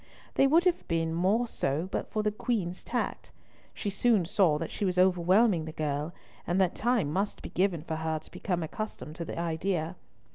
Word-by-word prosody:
They 270 Hz, -, +5 dB
would 325 Hz, +5 st, +5 dB
have 360 Hz, -2 st, +1 dB
been 165 Hz, -1 st, 0 dB
more 195 Hz, +8 st, +2 dB
so 155 Hz, -4 st, -1 dB
but -, -, -2 dB
for 215 Hz, -, -1 dB
the 210 Hz, -, +2 dB
Queen's 205 Hz, -5 st, -2 dB
tact. -, -, -3 dB, 0.4 s
She 205 Hz, -, -4 dB
soon 205 Hz, -2 st, +3 dB
saw 180 Hz, -4 st, +3 dB
that 165 Hz, +1 st, -4 dB
she -, -, -4 dB
was 185 Hz, -2 st, +1 dB
overwhelming 185 Hz, 0 st, +4 dB
the 160 Hz, -, -5 dB
girl, 150 Hz, 0 st, -2 dB, 0.4 s
and 175 Hz, +2 st, +1 dB
that 185 Hz, -2 st, +3 dB
time 225 Hz, -11 st, +1 dB
must 200 Hz, +3 st, -1 dB
be -, -, -6 dB
given 180 Hz, -4 st, +1 dB
for 160 Hz, -1 st, -3 dB
her 160 Hz, 0 st, -1 dB
to 155 Hz, -, -12 dB
become 175 Hz, -3 st, -2 dB
accustomed 160 Hz, -2 st, -5 dB
to 170 Hz, -, -4 dB
the -, -, -6 dB
idea. 170 Hz, +1 st, -1 dB
180 Hz, 195 wpm, -29 LUFS, 160-210 Hz, 0.4 s, They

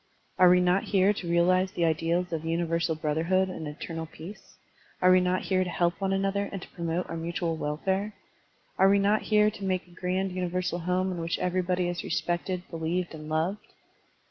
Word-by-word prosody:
Are 180 Hz, -1 st, +8 dB
we 180 Hz, 0 st, +6 dB
not 180 Hz, +2 st, +2 dB
here 195 Hz, 0 st, +3 dB
to 180 Hz, -4 st, -6 dB
realize 185 Hz, +2 st, +3 dB
the 170 Hz, -, +1 dB
ideals 165 Hz, +2 st, 0 dB
of 160 Hz, -1 st, -2 dB
universal 165 Hz, 0 st, 0 dB
brotherhood 165 Hz, +5 st, +1 dB
and 160 Hz, -4 st, -6 dB
eternal 160 Hz, +2 st, -6 dB
peace? 165 Hz, +6 st, -12 dB, 0.4 s
Are 185 Hz, -, +5 dB
we 185 Hz, -, +7 dB
not 180 Hz, +1 st, 0 dB
here 185 Hz, -1 st, +1 dB
to 180 Hz, -, -4 dB
help 175 Hz, +1 st, 0 dB
one 195 Hz, 0 st, 0 dB
another 195 Hz, +1 st, 0 dB
and 195 Hz, -, -4 dB
to -, -, -10 dB
promote 170 Hz, +1 st, -3 dB
our 165 Hz, -, -5 dB
mutual 165 Hz, 0 st, -2 dB
welfare? 190 Hz, +8 st, -2 dB, 0.6 s
Are 190 Hz, +1 st, +6 dB
we 200 Hz, -, +5 dB
not 205 Hz, +2 st, +2 dB
here 210 Hz, -1 st, +3 dB
to 200 Hz, -1 st, -10 dB
make 185 Hz, -1 st, -1 dB
a 180 Hz, -, -21 dB
grand 185 Hz, +2 st, -2 dB
universal 180 Hz, -1 st, -2 dB
home 180 Hz, +2 st, 0 dB
in 175 Hz, -, -4 dB
which 165 Hz, 0 st, -2 dB
everybody 180 Hz, 0 st, 0 dB
is 175 Hz, 0 st, -3 dB
respected, 175 Hz, +1 st, -2 dB
believed, 165 Hz, +2 st, -2 dB
and 155 Hz, -1 st, -8 dB
loved? 165 Hz, +6 st, -2 dB
180 Hz, 195 wpm, -28 LUFS, 165-190 Hz, 0.6 s, Are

